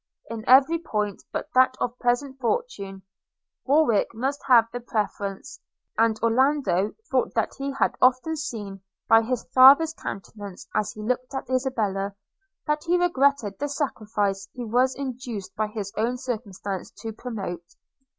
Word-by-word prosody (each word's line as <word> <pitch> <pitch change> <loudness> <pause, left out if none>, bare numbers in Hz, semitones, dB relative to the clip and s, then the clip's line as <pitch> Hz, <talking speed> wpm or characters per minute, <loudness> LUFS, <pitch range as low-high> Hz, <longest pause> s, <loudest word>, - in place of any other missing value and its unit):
In 225 -1 -5
every 275 +6 +6
point, 210 - -3
but - - -3
that 255 0 +5
of 245 0 -2
present 260 +2 0
fortune, 230 - -3 0.6
Warwick 270 -7 +3
must 270 +5 -2
have 240 -4 +7
the 245 - -3
preference; 205 -4 -4 0.4
and 225 -1 +2
Orlando 230 -5 +2 0.2
thought - - +1
that - - 0
he 275 0 -2
had 270 - +1
often 255 +5 +3
seen, 210 -10 -6 0.3
by 225 0 +7
his 240 +1 -2
father's 280 +5 +8
countenance 200 - -8
as 215 -1 0
he 215 - -8
looked 255 +3 -2
at 265 - -5
Isabella, 210 -7 -1 0.5
that 300 -1 0
he 350 +1 +2
regretted 280 - +1
the 290 +1 -2
sacrifice 210 -8 -2
he 245 -1 -5
was 250 +4 +2
induced 245 -7 -6
by 215 0 0
his 210 -2 -6
own 235 +3 0
circumstances 210 -6 -5
to 225 -1 -5
promote. 195 -7 -6
240 Hz, 145 wpm, -25 LUFS, 210-270 Hz, 0.6 s, father's